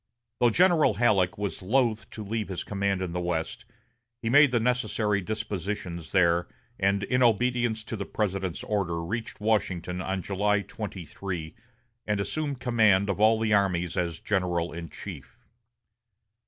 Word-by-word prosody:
Though 120 - +5
General 170 - +4
Halleck 100 -5 +2
was 100 -1 -3
loath 115 +2 +1
to 110 - -7
leave 110 +1 -3
his 95 -3 -4
command 100 -2 -1
in 90 - -4
the 90 - -2
West, 90 +7 -3 0.5
he 115 - -2
made 145 +2 +7
the 120 -1 +1
necessary 115 -4 0
dispositions 100 -4 -4
there, 85 -2 +3 0.3
and 100 +1 +2
in 125 +5 +1
obedience 120 -1 +2
to 110 - -5
the 100 -2 -5
President's 95 -4 -2
order 95 -6 -1
reached 115 +5 -4
Washington 95 -4 0
on 95 -1 -2
July 105 +1 +1
23, 95 -4 -6 0.5
and 105 -1 0
assumed 140 +5 -2
command 110 -6 +3
of 100 - -4
all 110 +1 +5
the 110 -1 +1
armies 90 -4 +1
as 85 -2 -1
general 90 -4 -1
in 85 -1 -6
chief. 75 -5 -9
100 Hz, 150 wpm, -27 LUFS, 90-110 Hz, 0.5 s, made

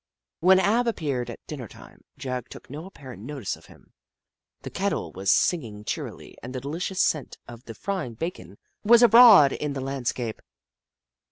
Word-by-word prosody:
When 185 +2 +5
Ab 230 +5 +2
appeared 140 - -2
at 120 - -10
dinner 135 -7 -7
time, - - -16 0.2
Jagg 130 -2 -5
took - - -12
no 155 +5 -7
apparent 130 - -12
notice 130 -3 -5
of - - -19
him. - - -20 0.7
The - - -7
kettle - - -2
was 95 0 0
singing 115 -12 0
cheerily - - -6
and 125 +2 -8
the - - -2
delicious 170 +8 -4
scent 150 -5 -1
of 120 0 -12
the 115 - -9
frying 185 - -4
bacon 110 - -6 0.3
was 235 +3 +6
abroad 230 - +8
in 150 -1 -3
the 135 - -4
land 135 -2 -4
scape. 115 -4 -3
140 Hz, 170 wpm, -25 LUFS, 120-185 Hz, 0.7 s, abroad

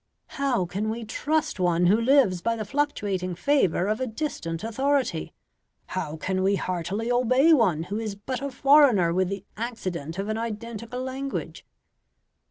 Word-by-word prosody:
how 255 -9 +1
can 200 +5 -3
we 225 +1 -4
trust 305 +2 -1
one 175 -1 +2
who 205 +6 +4
lives 235 -8 +4
by 230 +3 0
the 215 -2 -4
fluctuating 200 -9 -1
favour 195 - +2
of 215 +4 -1
a 260 - 0
distant 220 - -4
authority? 260 - 0 0.5
how 155 +2 -4
can 185 +4 -1
we 195 +1 +3
heartily 190 +6 -2
obey 255 +6 +4
one 190 - +3
who 200 +5 -4
is 215 -3 -4
but 245 +5 -5
a 280 - -2
foreigner 265 - +5
with 185 0 +1
the 200 0 -5
accident 185 -9 -4
of 195 +1 -3
an 215 +1 -2
identical 230 +1 -5
language?" 265 +1 -5
220 Hz, 160 wpm, -26 LUFS, 185-260 Hz, 0.5 s, foreigner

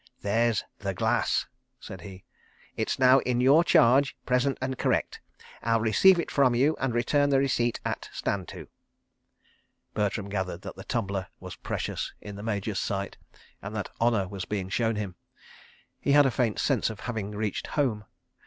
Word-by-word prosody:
"There's 115 +2 +1 0.2
The - - -3
Glass," - - +1 0.3
said 95 -2 -9
he. 95 +1 -10 0.5
"It's - - -1
now 130 +1 +6
in 125 -2 -1
your 140 +6 +6
charge, 135 -2 +4
present 125 +2 +1
and 130 0 -2
correct. - - -1 0.4
I'll 115 0 +2
receive 115 - +5
it - - -3
from 130 -4 +3
you 140 +6 +3
and 135 -2 0
return 145 +4 +2
the 140 - +4
receipt 120 -3 +1
at - - -3
'Stand 95 -4 -2
to.'.. - - -9 0.7
." - - -40
Bertram 105 -1 -1
gathered 95 -3 -3
that - - -7
the - - -9
tumbler 100 -6 -2
was - - -8
precious - - -4
in 105 -1 -9
the 100 - -8
Major's 105 -2 -2
sight, 100 0 -3 0.4
and 100 +2 -7
that 100 -3 -4
honour 115 -5 +2
was 95 -1 -6
being 95 -3 -3
shown 115 +2 0
him. 100 -4 -5 0.8
He 140 - +1
had 145 0 +7
a 135 - +2
faint 115 -3 0
sense 135 -6 +1
of 110 -1 -8
having 110 -5 -4
reached 105 -1 -3
Home. 115 -8 0
115 Hz, 170 wpm, -27 LUFS, 100-130 Hz, 0.8 s, had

